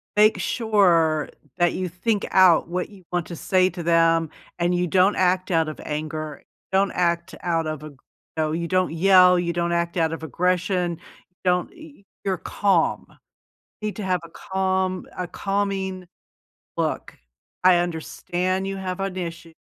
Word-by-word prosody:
make 215 +1 +5
sure 175 - +2 0.3
that 175 0 +3
you 185 -1 -3
think 200 +4 -1
out 185 -4 +5
what 180 +1 -2
you 200 -3 -16
want 175 -2 -1
to 170 - -7
say 185 +2 +2
to 175 -1 -7
them, 165 -1 +3 0.3
and 175 +1 +1
you 180 0 +1
don't 190 +3 +3
act 185 0 +1
out 165 -2 +2
of 155 - -8
anger, 155 0 -4 0.3
don't 195 0 +2
act 170 0 -1
out 165 -2 0
of 155 -1 -4
you 145 -3 -11 0.5
you 170 +1 -2
don't 185 +1 +1
yell, 180 +1 +6
you 170 -1 -1
don't 170 0 -1
act 170 0 -1
out 165 -2 +1
of 165 0 -6
aggression, 180 +2 0 0.5
don't 180 0 +2
y 320 -4 -13
y - - -24 0.2
you're 190 -2 0
calm. 190 -1 +1 0.8
You 215 - -2
need 210 - -6
to 210 - -5
have 185 -1 0
a 170 - -12
calm 190 0 -1
a 180 - -2
calming 195 -1 -2 0.7
look. - - -2 0.5
"I 185 -1 +6
understand 175 +2 -2
you 195 0 -3
have 185 -1 -4
an 195 -1 -3
issue. 170 -2 -6
180 Hz, 165 wpm, -23 LUFS, 170-190 Hz, 0.8 s, yell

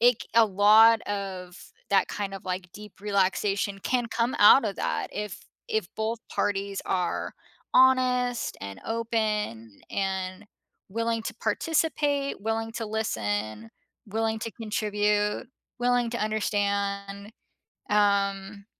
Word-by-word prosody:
it 240 -1 +4
c - - -14
a 230 -1 +7
lot 215 +3 +6
of 190 -3 -5 0.3
that 195 -1 +4
kind 200 -1 -4
of, 195 - -9
like, 180 0 -4
deep 210 -1 -12
relaxation 200 0 0
can 245 +2 0
come 230 +2 -1
out 215 +4 +8
of 200 -2 -2
that - - -2
if 210 -2 -4 0.3
if 220 -4 0
both 220 +1 -1
parties 200 -1 -1
are 180 -2 -1 0.4
honest 255 -2 +3
and 100 -1 -7
open 215 - -2
and 190 0 -2 0.4
willing 230 +2 -1
to - - -5
participate, 290 -5 0
willing 225 +1 -2
to 225 -1 -4
listen, 110 - -2 0.4
willing 220 +1 -1
to 230 - -5
contribute, 210 -1 0 0.3
willing 245 -1 +2
to 235 - -3
understand, 200 -1 -1 0.6
um 200 -1 +1
210 Hz, 120 wpm, -27 LUFS, 195-230 Hz, 0.6 s, out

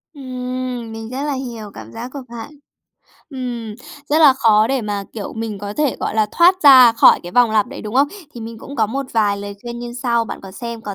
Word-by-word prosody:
Ừm, 255 -3 -5
mình 225 0 -7
rất 260 +3 -4
là 295 -1 -1
hiểu 235 -6 -6
cảm - - -11
giác 235 +2 -6
của 280 - -6
bạn. 235 +2 -8 0.8
Ừm, 240 -5 -5 0.3
rất 300 - +3
là 300 -4 +7
khó 220 -4 +3
để 265 0 -1
mà, 205 -2 -3
kiểu, 210 -3 -6
mình 220 -2 -5
có 205 0 -6
thể, 290 +4 0
gọi - - -2
là, 215 -1 +2
thoát 365 +2 +4
ra 260 -5 +9
khỏi 230 - +6
cái 175 - -9
vòng 245 0 +4
lặp 215 -2 +2
đấy, - - -9
đúng 215 +1 -6
không? 275 +2 +4 0.3
Thì 240 - -8
mình 225 0 -8
cũng 280 +5 -10
có 220 - +2
một 270 +5 -4
vài 210 -3 +2
lời 200 0 -7
khuyên 240 0 -6
như 240 0 -6
sau, 235 -2 +1
bạn 220 - -7
có 195 - -9
xem 235 +2 -6
có 205 -3 -6
235 Hz, 240 wpm, -19 LUFS, 220-255 Hz, 0.8 s, ra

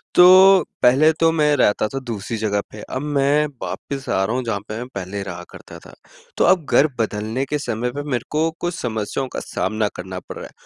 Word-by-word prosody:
तो, 185 +1 +8 0.2
पहले 140 +6 +5
तो 165 0 +4
मैं 150 -2 +2
रहता 105 -3 +2
था 135 +5 -5
दूसरी 115 -1 -4
जगह 105 -2 0
पे 105 - -10
अब 130 - -5
मैं 145 0 +2 0.2
वापिस 130 +9 -6
आ 95 - +1
रहा 115 - -2
हूँ 130 - -1
जहाँ 110 -4 -2
पे 110 - -4
मैं 120 +2 -6
पहले 95 +1 -5
रहा 90 -2 -7
करता - - -12
था। - - -16 0.4
तो - - +3
अब 180 -5 +3
घर 150 - +5
बदलने 110 +4 -2
के 150 +2 -2
समय 120 -2 -3
पर 145 +2 -5
मेरे 120 -2 -1
को 160 +2 +1
कुछ 175 0 -2
समस्याओं 115 +3 -3
का - - -3
सामना 110 0 -2
करना 95 0 -6
पड़ - - -10
रहा - - -7
है। - - -20
125 Hz, 220 wpm, -21 LUFS, 105-150 Hz, 0.4 s, तो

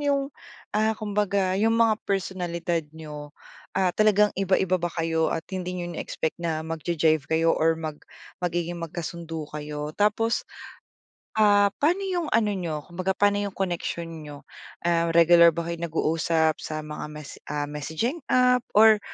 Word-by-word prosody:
yung, 280 -1 0 0.4
ah, 220 +1 +1
kumbaga 200 -3 0
yung 225 +1 +3
mga 225 -2 +3
personalidad 175 -3 -1 0.2
niyo? 150 -1 -9 0.4
Ah, 185 -2 +2
talagang 210 0 +4
iba-iba 190 -1 +1
ba 175 - 0
kayo 165 -1 0
at 165 - -3
hindi 180 -1 -3
niyo 175 -1 -4
ine-expect 160 0 -4
na 160 -2 -2
mag 165 0 -4
ja-jive 155 -3 +1
kayo 165 +1 +3
or 165 +1 +2
mag 155 -2 -6 0.4
magiging 175 -1 -2
magkasundo 165 -1 -5
kayo? 150 0 -5
Tapos, 210 +4 +1 1.0
ah, 205 -1 +5
pano 350 +7 +2
yung 355 -4 -1
ano 215 -2 +2
niyo 165 -6 -3
kumbaga 185 +3 -3
pano 205 0 +3
yung 200 -1 -3
connection 170 -3 -4
niyo? 145 -1 -10 0.4
Ah, 170 0 +2
regular 170 0 +7
ba 170 - -2
kayo 170 0 -4
nag-uusap 160 -1 +1
sa 155 0 -5
mga 150 0 -6
mes 150 -2 -9
ah, 150 0 -2
messaging 160 - -3
app? 250 -1 +3
Or 215 0 +7
175 Hz, 150 wpm, -25 LUFS, 160-205 Hz, 1.0 s, regular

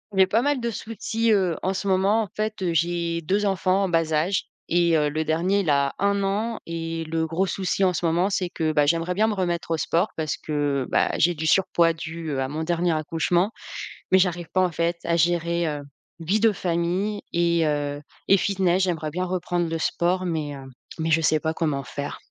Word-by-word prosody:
J'ai 190 -1 +5
pas 220 +5 +2
mal 290 -2 +1
de 235 -1 -2
soucis, 225 +1 -2
heu, 185 -6 +2
en 190 - 0
ce 195 +1 -4
moment. 195 +3 +3
En - - -6
fait, 215 -1 -3
heu, 175 -2 0
j'ai 170 0 0
2 195 +6 0
enfants 190 0 +1
en 195 - 0
bas 165 -2 +1
âge 175 +5 +1 0.3
et 170 -1 +3
heu, 150 -1 +2
le 155 +2 -2
dernier 175 +6 +1
il 175 - -2
a 140 -1 +2
1 200 0 +1
an 215 +4 -1
et 165 0 -3
le 160 0 -1
gros 165 +4 0
souci 190 +1 -1
en 185 - +4
ce 175 - -2
moment 170 +4 +2
c'est 185 -3 -1
que, 160 -2 -1
bah, 150 -1 +3
j'aimerais 165 +4 +1
bien 215 +3 +3
me 220 - 0
remettre 175 -4 -2
au 165 - +2
sport 170 +5 +1
parce 155 -2 -2
que, 145 -3 -1
bah, - - +2
j'ai 175 - +3
du 160 -1 -3
surpoids 170 -1 +3
dû, 160 0 -6
heu, 135 -2 -1
à 130 - -1
mon 155 +4 -4
dernier 175 +1 +1
accouchement. 165 +5 0 0.6
Mais 190 - +6
j'arrive 175 -2 0
pas 185 - +3
en 180 - -1
fait 170 +2 0
à 170 - +1
gérer, 170 0 +1
heu, 145 -1 -4 0.4
vie 190 +6 +1
de 225 -1 +4
famille 180 +3 -1
et 170 -1 +2
heu 145 -1 -1 0.3
et 195 - +7
fitness. 190 -1 +1
J'aimerais 160 -4 -2
bien 180 +4 -2
reprendre 175 -1 -1
le 165 0 -2
sport 180 +3 0
mais 155 -5 -2
heu, 135 - -10 0.3
mais 160 0 -1
je 165 +1 +4
sais 155 -1 +2
pas 160 +1 -1
comment 150 -4 -1
faire. 140 +3 -5
170 Hz, 220 wpm, -24 LUFS, 160-190 Hz, 0.6 s, et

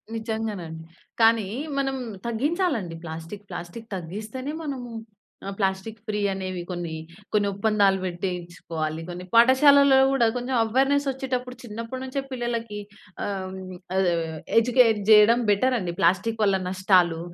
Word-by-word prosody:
నిజంగానండి. 215 -8 -4 0.4
కానీ 225 -2 +5 0.3
మనం 270 -1 0 0.3
తగ్గించాలండి. 240 - -1
ప్లాస్టిక్, 165 +5 -8
ప్లాస్టిక్ 175 +6 -8
తగ్గిస్తేనే 215 - -6
మనము 260 -5 -5 0.6
ఆ! - - -2
ప్లాస్టిక్ 190 +3 -1
ఫ్రీ 210 -1 -1
అనేవి 185 -2 -4
కొన్ని, 175 -2 -4 0.4
కొన్ని 205 -1 +3
ఒప్పందాలు 200 -1 +3
పెట్టించుకోవాలి. 170 -3 -4
కొన్ని 180 +1 -6
పాఠశాలలో 270 +3 +7
గూడా 255 -4 +3
కొంచెం 250 +1 -2
అవేర్‌నెస్ 275 +5 +2
వచ్చేటప్పుడు 255 -1 -3
చిన్నప్పటినుంచే 255 +4 -5
పిల్లలకి 235 -4 -3 0.5
ఆహ్, 190 -2 -4 0.4
ఆ! - - +1 0.6
ఎడ్యుకేట్ 235 -2 +4
చేయడం 215 +2 +7
బెటర్ 250 +6 +3
అండి. 175 -3 -3
ప్లాస్టిక్ 190 +6 +2
వల్ల 195 -2 +3
నష్టాలు, 185 -3 +3
215 Hz, 115 wpm, -25 LUFS, 185-250 Hz, 0.6 s, పాఠశాలలో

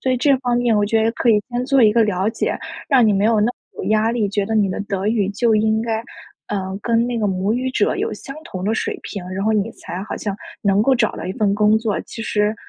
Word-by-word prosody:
所 260 - 0
以 - - +1
这 275 +2 +3
方 245 -2 0
面 240 -2 +2
我 205 - +3
觉 220 +1 +2
得 225 - +2
可 240 - -1
以 210 -1 +3
先 245 +1 -1
做 270 -3 +4
一 210 -1 +6
个 230 -1 +4
了 195 0 0
解， 225 - -1 0.3
让 260 -5 +5
你 210 - +4
没 200 +1 +1
有 220 -1 +3
那 210 - +3
么 245 - 0 0.3
有 - - -4
压 220 +1 +2
力， 220 -4 0
觉 205 0 -1
得 220 - -2
你 205 -3 +3
的 - - -3
德 200 -1 -3
语 210 -4 +1
就 225 +1 +2
应 220 +1 +2
该， 225 -1 -2 0.5
呃， 195 -1 -3
跟 235 0 +2
那 240 -1 -2
个 210 - +1
母 195 +3 0
语 255 +1 -1
者 - - +1
有 - - -2
相 275 +1 -8
同 185 -1 -6
的 220 +3 +1
水 - - -2
平， 195 -4 -6
然 190 +1 -3
后 220 - +2
你 215 +1 0
才 180 +2 -7
好 - - -5
像 205 -2 -4 0.3
能 200 0 +3
够 265 +2 +4
找 235 -3 +1
到 - - -7
一 185 - -3
份 205 -4 +1
工 210 +1 +4
作， 220 -3 -1
其 225 - -9
实 210 0 0
220 Hz, 300 characters per minute, -20 LUFS, 205-235 Hz, 0.5 s, 一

